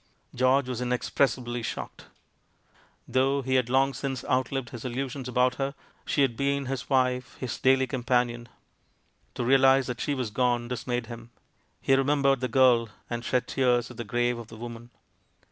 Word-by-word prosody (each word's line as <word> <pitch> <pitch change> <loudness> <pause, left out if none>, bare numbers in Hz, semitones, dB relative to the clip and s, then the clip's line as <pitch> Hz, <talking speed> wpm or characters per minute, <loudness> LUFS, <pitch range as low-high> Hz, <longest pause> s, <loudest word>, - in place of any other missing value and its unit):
George 130 +1 +2
was 125 -1 -4
inexpressibly 125 0 0
shocked. 110 - -6 1.0
Though 135 +2 +1
he 130 +1 -1
had 125 -2 +2
long 135 +2 +3
since 135 -3 -4
outlived 130 -1 -1
his 120 -3 -8
illusions 130 +1 -4
about 125 0 +2
her, 135 +1 -2 0.3
she 140 - +2
had 125 -4 +1
been 140 +2 0
his 130 -1 -4
wife, 125 -2 +1
his 125 -3 -4
daily 130 +1 +4
companion. 120 -2 -1 0.9
To - - -2
realise 135 +1 +5
that 125 -1 -5
she 145 - -1
was 125 -5 -3
gone 120 0 +1
dismayed 120 0 -3
him. 115 0 -10 0.5
He 135 - +3
re 135 - +2
membered 140 -1 +2
the 130 - -1
girl, 120 -2 +4 0.2
and 120 0 -3
shed 125 +1 0
tears 125 -2 +1
at - - -12
the 120 - -4
grave 120 +2 0
of 115 - -9
the 115 - -12
woman. 120 0 -8
125 Hz, 170 wpm, -27 LUFS, 120-135 Hz, 1.0 s, realise